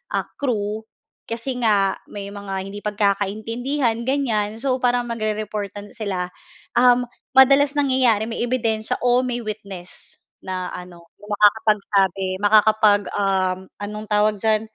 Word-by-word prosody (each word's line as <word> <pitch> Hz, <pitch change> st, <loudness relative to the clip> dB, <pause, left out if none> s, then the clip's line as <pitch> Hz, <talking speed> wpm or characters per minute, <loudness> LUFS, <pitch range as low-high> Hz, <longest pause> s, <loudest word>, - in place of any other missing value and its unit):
ah, -, -, -1 dB
crew 220 Hz, -4 st, -2 dB, 0.4 s
kasi 230 Hz, +3 st, -3 dB
nga, 200 Hz, -4 st, +3 dB, 0.2 s
may 200 Hz, -1 st, -7 dB
mga 200 Hz, -1 st, -6 dB
hindi 200 Hz, +1 st, -8 dB
pagkakaintindihan, 220 Hz, +5 st, -1 dB
ganyan. 225 Hz, -5 st, 0 dB
So, 260 Hz, +1 st, -1 dB
parang 245 Hz, -1 st, +2 dB
magre-reportan 210 Hz, -2 st, -4 dB
sila. 200 Hz, -6 st, -3 dB, 0.5 s
Uhm, 245 Hz, 0 st, +5 dB, 0.3 s
madalas 275 Hz, +2 st, +6 dB
nangyayari 260 Hz, -6 st, +3 dB
may 225 Hz, 0 st, -4 dB
ebidensiya 225 Hz, -3 st, 0 dB
o 245 Hz, +1 st, +4 dB
may 245 Hz, -1 st, -2 dB
witness 200 Hz, -5 st, -7 dB, 0.2 s
na 185 Hz, -1 st, -4 dB
ano, 175 Hz, -1 st, -10 dB, 0.2 s
na -, -, -12 dB
makakapagsabi, 205 Hz, -2 st, +2 dB, 0.2 s
makakapag 215 Hz, 0 st, +5 dB
uhm, 190 Hz, -2 st, +1 dB, 0.2 s
anong 210 Hz, +1 st, -6 dB
tawag 210 Hz, 0 st, +3 dB
diyan 220 Hz, -1 st, +2 dB
215 Hz, 120 wpm, -22 LUFS, 205-240 Hz, 0.5 s, madalas